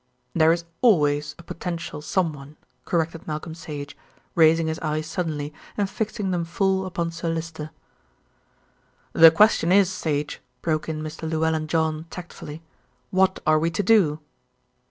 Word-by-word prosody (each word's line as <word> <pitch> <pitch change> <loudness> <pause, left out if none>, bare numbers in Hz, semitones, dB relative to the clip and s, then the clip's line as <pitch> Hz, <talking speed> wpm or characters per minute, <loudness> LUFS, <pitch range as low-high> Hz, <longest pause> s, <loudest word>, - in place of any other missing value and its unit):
"There 160 0 +5
is 170 0 -1 0.2
always 150 - +3
a 170 - -13
potential 170 -3 -5
someone," 150 -4 -2 0.3
corrected 165 -1 -1
Malcolm 155 +1 -4
Sage, 145 -3 -7 0.4
raising 165 0 +5
his 160 0 -2
eyes 155 -1 -2
suddenly 155 -4 -3 0.2
and 205 -2 +1
fixing 210 -1 -3
them 175 -2 0
full 190 +2 0
upon 170 -2 -2
Sir 165 0 -3
Lyster. 160 -2 -4 1.4
"The 165 0 +9
question 175 0 +4
is, 195 -1 +5
Sage," 150 -5 -2 0.2
broke 155 -1 -1
in 155 -1 -3
Mr. 155 +1 -5
Llewellyn 160 -1 0
John 160 0 0
tactfully, 165 -3 -9 0.5
"what 190 0 +2
are 155 0 +4
we 165 +2 +1
to 185 +5 -1
do?" 180 -8 +4
165 Hz, 140 wpm, -24 LUFS, 155-175 Hz, 1.4 s, The